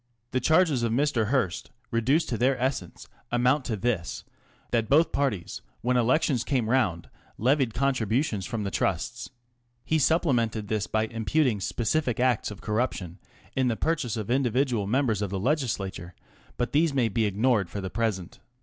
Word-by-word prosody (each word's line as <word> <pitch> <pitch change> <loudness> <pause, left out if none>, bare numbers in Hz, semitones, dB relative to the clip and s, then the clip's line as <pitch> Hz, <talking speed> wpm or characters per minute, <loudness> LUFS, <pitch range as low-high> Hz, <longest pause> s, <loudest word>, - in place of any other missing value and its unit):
The 130 - +1
charges 155 -1 +3
of 115 -1 0
Mr. 120 -3 +1
Hearst, 110 -9 -1 0.2
reduced 130 +8 +2
to 115 - -1
their 130 +2 +2
essence, 130 -9 -3 0.2
amount 125 +3 +2
to 115 - -1
this, 100 -6 -2 0.5
that 115 -2 0
both 155 +5 +4
parties 120 -12 -2 0.2
when 125 +1 +1
elections 125 +1 +2
came 120 -4 0
round 95 -11 +1 0.3
levied 130 -1 +1
con 135 +3 +2
tributions 110 - -1
from 115 -2 -3
the 100 - -3
Trusts, - - -2 0.6
He 160 - +1
supplemented 120 - +1
this 110 -2 -1
by 110 0 0
imputing 115 +2 0
specific 125 +3 -1
acts 125 -2 +2
of 105 -1 -9
corruption 105 -5 -2 0.4
in 130 -1 +2
the 115 -2 0
purchase 150 -9 -1
of 110 +1 -4
individual 125 -4 +1
members 115 -3 +1
of 100 - -1
the 95 0 -3
legislature, 100 - -2 0.4
but 120 - -1
these 150 0 +2
may 125 -4 +3
be 110 +1 0
ignored 105 -1 +1
for 100 - -5
the 95 -1 -5
present. 105 -5 -2
120 Hz, 165 wpm, -27 LUFS, 105-135 Hz, 0.6 s, both